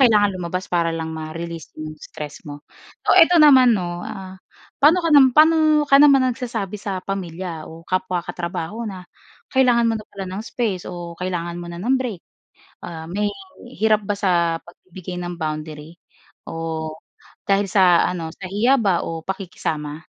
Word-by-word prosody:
kailangan 215 -5 +5
lumabas 180 +1 -4
para 170 -1 +1
lang 160 0 -4
ma-release 160 +1 -7
'yung 155 0 -7
stress 150 0 -9
mo. 145 -1 -8 0.5
O - - +6
eto 335 0 +7
naman 260 -5 +7
'no, 175 -3 -3
ah 190 -2 -8 0.4
paano 315 +6 +5
ka 335 - -1 0.2
paano 315 +4 +6 0.3
ka 275 - +7
naman 280 -2 +7 0.2
nagsasabi 220 -5 -4
sa 195 -2 -4
pamilya 180 -4 -5
o 165 +1 -11
kapwa 185 -1 -1
katrabaho 175 +6 -5
na 185 -4 -8 0.4
kailangan 245 -3 +3
mo 225 - +1
na 215 - -8
pala 195 -1 -6
ng 190 +3 -5
space 215 -7 -2
o 170 -1 -7
kailangan 175 -2 -3
mo 175 - -6
na 170 - -7
ng 255 +6 +2
break, 235 -9 -4 0.6
ah, 160 -2 -7
may 205 +4 -1 0.5
hirap 215 -1 +3
ba 205 - -1
sa 170 -4 +1
pagbibigay 180 +1 -11
ng 175 0 -6
boundary 155 +1 -5 0.6
o 160 -1 -4 0.5
dahil 200 0 +1
sa 180 -3 +5
ano, 165 -2 -5
sa 185 +1 -9
hiya 225 +7 +3
ba 190 -5 +1
o 165 -1 -5
pakikisama? 160 -5 -5
185 Hz, 160 wpm, -21 LUFS, 165-210 Hz, 0.6 s, eto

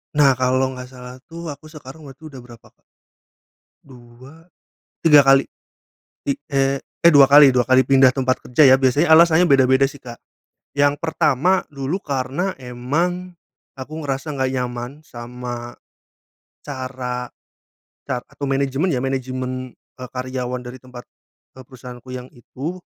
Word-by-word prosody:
Nah, 145 -2 +5
kalau 130 +1 +1
nggak 125 -1 -9
salah, 125 -1 -11
tuh, 165 -1 -7
aku 145 +2 -12
sekarang 155 -2 -12
berarti 135 +3 -15
udah 135 - -11
berapa, 120 -2 -16
Kak? - - -53 1.1
2, 130 +5 -17 0.6
3 150 -3 +8
kali. 135 0 +5 0.8
Ti 140 - -1 0.2
eh, 135 0 +1
eh, 170 - +2
2 140 -3 +7
kali 145 0 +8
2 125 -1 +1
kali 130 0 +5
pindah 135 -1 +5
tempat 130 -1 0
kerja, 140 +5 +3
ya, 130 - +7
biasanya 140 +5 +2
alasannya 165 +1 +6
beda-beda, 130 0 +4
sih, 140 - -14
Kak. 120 -2 -11 0.6
Yang 145 0 +2
pertama 160 +2 +1
dulu 140 +6 -3
karena 140 +7 -2
emang 165 +9 -3 0.4
aku 155 +4 -7
ngerasa 140 +1 -4
nggak 130 -1 -1
nyaman 125 -1 -4 0.2
sama 120 0 -8 0.9
cara 130 -2 -5 0.8
car 125 -3 -3
atau 140 - -7
manajemen, 135 +5 0
ya, 125 - -2
manajemen, 130 -1 -4 0.2
eee, 125 -1 -8
karyawan 125 -1 -4
dari 125 +1 -9
tempat, 125 -1 -12 0.5
eee, - - -10
perusahaanku 125 -1 -12
yang 125 0 -8
itu, 140 +8 -7
130 Hz, 140 wpm, -20 LUFS, 125-145 Hz, 1.1 s, 3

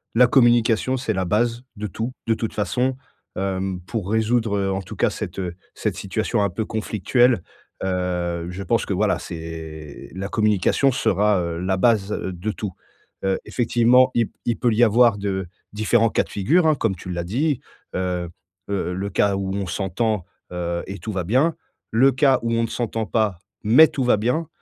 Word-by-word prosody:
La 125 +1 +7
communication, 120 0 +3
c'est 120 -4 -1
la 95 -1 -1
base 115 +5 +1
de 105 0 -4
tout 110 +6 -4 0.2
de 115 - +4
toute 110 0 -3
façon, 125 +5 0 0.4
hem, 95 -1 -2
pour 95 +1 -4
résoudre, 110 -1 +1
heu, 95 -1 0
en 95 0 -1
tout 95 - -9
cas - - +2
cette, - - -6
heu 90 -2 -4 0.2
cette - - -2
situation 110 +2 -1
un 100 - +1
peu 100 +5 -3
conflictuelle, 115 +1 +1 0.4
heu, 90 -2 -1
je 90 +2 -6
pense 115 +2 +1
que - - -2
voilà, 105 +3 +1
c'est 80 -3 -8
la 95 +2 -4
communication 110 +6 +2
sera, 105 -4 +2
heu, 85 -1 -3
la 95 +1 0
base 105 -1 +3
de 95 0 -3
tout. 105 -3 -5 0.5
Heu, 95 -1 +1
effectivement, 125 +1 +3
il 115 -2 +2
p - - -35
il 115 - 0
peut 120 - +2
y 115 +3 +4
avoir 115 -1 +5
de 95 -2 -2 0.2
différents 110 +2 +2
cas - - +1
de - - -16
figure, 160 - +2
hein, 155 - +4
comme 115 -7 0
tu 90 - -10
l'as 85 -1 -2
dit, 130 - 0 0.4
heu 90 -2 -2 0.4
heu, 95 -3 -1
le 95 +2 -3
cas 100 +1 +2
où 95 -1 -2
on 100 -1 -2
s'entend, 100 +2 -1 0.3
heu, 85 -1 -3
et 100 +1 -7
tout 110 - -5
va 95 -2 -1
bien, 130 - +2 0.4
le 130 +5 +5
cas 135 0 +3
où 115 - 0
on 115 - +2
ne - - 0
s'entend 115 -1 -2
pas, 105 -4 0 0.2
mais 125 +10 +7
tout 135 - -2
va 125 -3 +4
bien 125 +10 0
105 Hz, 195 wpm, -22 LUFS, 95-120 Hz, 0.5 s, La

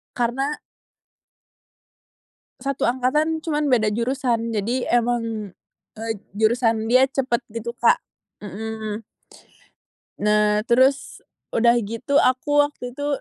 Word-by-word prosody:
Karena 265 +5 -1 2.0
satu 275 -1 -3
angkatan, 300 +6 0
cuman 300 -3 -1
beda 225 -4 +3
jurusan. 235 -1 -1
Jadi 230 +4 -1
emang, 230 -4 0 0.4
eee, 225 +1 -3 0.2
jurusan 225 0 +1
dia 255 +2 +6
cepat, 260 -3 -1 0.2
gitu 230 +1 -4
Kak - - +3 0.4
mhm. 215 +1 -5 1.2
Nah, 210 +1 +2
terus 260 +3 +2 0.3
udah 235 +1 +4
gitu 230 +7 -1
aku 290 +3 +2
waktu 250 -4 -8
itu 285 +3 -5
240 Hz, 100 wpm, -22 LUFS, 220-270 Hz, 2.0 s, dia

